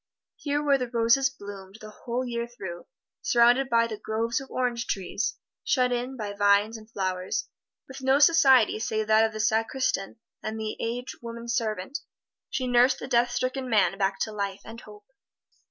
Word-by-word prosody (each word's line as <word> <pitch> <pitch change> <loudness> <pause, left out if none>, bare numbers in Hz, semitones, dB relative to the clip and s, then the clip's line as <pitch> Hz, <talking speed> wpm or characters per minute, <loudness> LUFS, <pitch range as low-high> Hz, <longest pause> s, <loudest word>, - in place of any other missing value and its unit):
Here 290 0 -1
where 280 -2 +3
the 250 -1 -3
roses 235 +3 +3
bloomed 200 -5 -10
the 215 0 -10
whole 240 +4 -4
year 235 -1 -3
through, 190 -8 -8 0.3
surrounded 245 +3 +4
by 230 0 +4 0.2
groves 230 +3 -1
of 270 - -11
orange 245 -2 -1
trees, 195 +2 -2 0.3
shut 250 -2 +2
in 250 +2 -2
by 210 -3 -4
vines 205 +2 +3
and 220 0 -11
flowers, 190 +5 -2 0.4
with 265 0 -10
no 265 +1 +3
society 275 -8 +5
save 220 -1 -1
that 220 +1 +4
of 225 - +1
the 215 - -7
sacristan 220 -2 0 0.3
and 220 +1 -4
an 215 -1 -3
aged 240 +2 -4
woman 235 0 -7
servant, 230 - -2 0.5
she 265 -1 -2
nursed 250 +1 +4
the - - -7
death 240 -1 +3
stricken 255 +1 -2
man 195 -5 +3
back 195 0 +1
to 220 - -1
life 200 -1 -4
and 230 +2 -10
hope. 210 -1 -14
230 Hz, 170 wpm, -27 LUFS, 215-255 Hz, 0.5 s, society